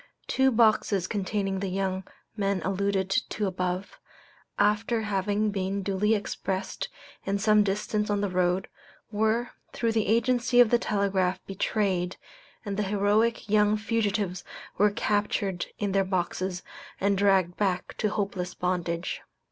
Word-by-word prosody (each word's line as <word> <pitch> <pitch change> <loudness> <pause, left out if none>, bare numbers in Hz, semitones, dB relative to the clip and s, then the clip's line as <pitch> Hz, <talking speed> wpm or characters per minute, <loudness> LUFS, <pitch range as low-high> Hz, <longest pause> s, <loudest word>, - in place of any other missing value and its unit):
Two 265 0 +3
boxes 215 -5 +3
containing 195 0 -2
the 195 0 -2
young 190 0 -1 0.3
men 200 -2 0
alluded 195 0 0
to 210 0 -1
above, 185 - -3 0.6
after 220 +2 +2
having 205 +1 0
been 195 0 -2
duly 205 +3 +2
expressed 195 -2 -3 0.3
and 200 +1 -1
some 215 0 +5
distance 210 +1 -1
on 205 0 +1
the 205 - 0
road, 180 0 +1 0.4
were, 220 +3 +1 0.2
through 230 -1 0
the 220 -1 0
agency 240 +2 +2
of 240 -3 +7
the 240 - +5
telegraph, 195 -4 0
betrayed, 190 -2 -1 0.5
and 200 -1 -3
the - - +1
heroic 210 +3 +2
young 210 0 +3
fugitives 210 -4 -1 0.3
were 210 +1 +4
captured 205 -3 -1
in 205 -2 -1
their 195 0 +3
boxes 185 -1 -2 0.4
and 200 +1 +2
dragged 190 -3 +3
back 185 -3 -1
to 215 - +1
hopeless 195 -4 -3
bondage. 175 -1 -2
200 Hz, 135 wpm, -27 LUFS, 190-215 Hz, 0.6 s, of